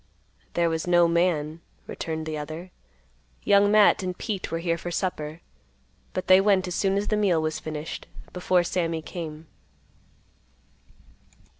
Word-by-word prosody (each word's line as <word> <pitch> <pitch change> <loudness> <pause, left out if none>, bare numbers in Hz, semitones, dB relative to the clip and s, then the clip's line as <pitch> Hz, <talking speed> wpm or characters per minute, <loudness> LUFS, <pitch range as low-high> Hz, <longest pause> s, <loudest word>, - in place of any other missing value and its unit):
"There 170 0 +3
was 160 +1 -2
no 175 -1 +5
man," 165 -2 0 0.2
returned 160 -1 -4
the 155 -1 -4
other. 155 +4 -7 0.7
"Young 200 0 +5
Matt 210 -1 +5
and 180 -1 -4
Pete 200 -4 -4
were 165 - -2
here 165 0 0
for 170 +1 -6
supper, 165 -3 -3 0.7
but 185 - -3
they 185 +1 +7
went 195 -2 +3
as 180 - -4
soon 195 +2 +1
as 205 - -1
the 215 - +2
meal 195 -6 +2
was 155 0 -2
finished, 155 0 -6 0.3
before 180 0 +2
Sammy 165 -2 -1
came." 160 -2 -7
170 Hz, 145 wpm, -26 LUFS, 160-185 Hz, 0.7 s, they